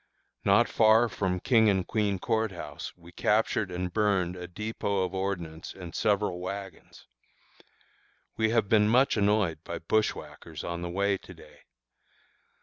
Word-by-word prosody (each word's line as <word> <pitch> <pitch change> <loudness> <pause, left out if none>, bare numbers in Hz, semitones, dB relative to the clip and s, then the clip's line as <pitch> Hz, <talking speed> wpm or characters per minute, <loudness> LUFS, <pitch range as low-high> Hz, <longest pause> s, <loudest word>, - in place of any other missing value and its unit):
Not - - +4
far 110 +2 +5
from 95 -4 -2
King 110 0 +4
and 95 -2 +1
Queen 105 -2 0
Court 110 +2 0
House 85 -5 -7
we 85 0 -15
captured 105 0 +1
and 90 0 -4
burned 95 -4 +1
a 90 -1 -7
dépôt 100 0 -2
of 90 - -6
ordnance 85 -4 -4
and 90 -3 -9
several 105 -4 0
wagons. 95 -1 -8 1.3
We 110 0 +1
have 115 -2 +2
been 105 0 +4
much 125 +5 +4
annoyed 100 -6 +2
by 85 - -5
bushwhackers 85 -4 -2
on 85 0 -4
the 85 - -4
way 100 +2 0
to - - -13
day. - - -16
100 Hz, 145 wpm, -28 LUFS, 90-110 Hz, 1.3 s, far